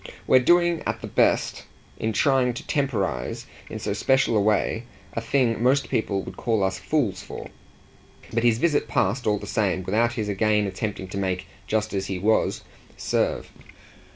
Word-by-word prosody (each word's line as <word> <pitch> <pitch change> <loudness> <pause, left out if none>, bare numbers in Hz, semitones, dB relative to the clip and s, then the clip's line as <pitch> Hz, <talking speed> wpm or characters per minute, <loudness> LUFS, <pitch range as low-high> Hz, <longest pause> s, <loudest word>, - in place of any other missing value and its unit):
"We're 130 - +6
doing, 175 +4 +3
at - - -2
the - - -5
best, - - +1 0.3
in 110 - 0
trying 125 +1 +2
to - - -7
temporise 110 - -1 0.2
in - - -5
so - - -2
special 135 -3 +2
a 105 - +4
way, 110 +2 +1 0.3
a 115 - -2
thing 115 -1 +1
most 135 +3 +2
people 100 -3 -1
would - - -9
call 110 -4 0
us 95 0 -1
fools 110 -12 0
for." - - -9 0.8
But 115 - +1
his 115 -1 +3
visit 145 -3 +1
passed, 120 +1 0
all 105 -1 +3
the - - -7
same, 95 -4 0
without 115 +6 +1
his 110 -4 -3
again 105 +1 +2
attempting 100 0 -4
to 100 - -4
make 95 -1 -2 0.2
"just 110 -1 -1
as 95 -1 -2
he 95 - -3
was" 110 +4 +1 0.3
serve. - - -1
110 Hz, 175 wpm, -24 LUFS, 100-125 Hz, 0.8 s, We're